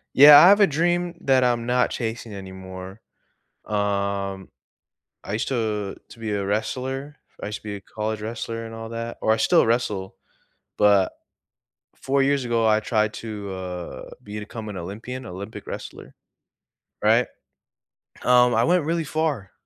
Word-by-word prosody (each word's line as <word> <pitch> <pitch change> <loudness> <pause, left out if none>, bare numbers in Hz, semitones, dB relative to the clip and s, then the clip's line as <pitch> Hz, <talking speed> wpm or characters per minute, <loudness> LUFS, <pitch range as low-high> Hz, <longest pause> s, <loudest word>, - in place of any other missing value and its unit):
Yeah. 145 +1 +11
I 175 - +9
have 205 +2 +6
a 200 - +7
dream 175 +3 0
that 130 -1 +3
I'm 120 -2 +1
not 125 0 +2
chasing 115 -1 -4
anymore. 95 0 -9 0.6
Um, 100 -2 -2 0.8
I - - -5
used 105 - -1
to 110 -6 -2
to - - -13
be 110 -1 -4
a 100 -1 -1
wrestler, 130 +7 -3 0.3
I - - -3
used 105 0 -4
to - - -29
be 105 -1 -4
a - - -9
college 110 +2 -4
wrestler 115 +1 -4
and 115 - -9
all 115 0 -7
that 115 0 -5
or 110 - +3
I - - +3
still 110 - +4
wrestle, 105 -5 -1 0.6
but, 100 -2 +4 0.9
4 135 +1 +1
years 140 -1 +2
ago, 115 -1 +1
I 110 0 +4
tried 110 -1 0
to, 105 -3 -6
uh, 90 -2 -7
become 105 +1 -7
an 105 - -6
Olympian, 115 +8 -6
Olympic 100 +4 -8
wrestler, - - -8 0.9
right, - - +4 1.0
um, 125 -1 +5
I 115 - +3
went 175 +4 +3
really 165 +1 0
far, 150 -10 -2
110 Hz, 155 wpm, -24 LUFS, 100-125 Hz, 1.0 s, Yeah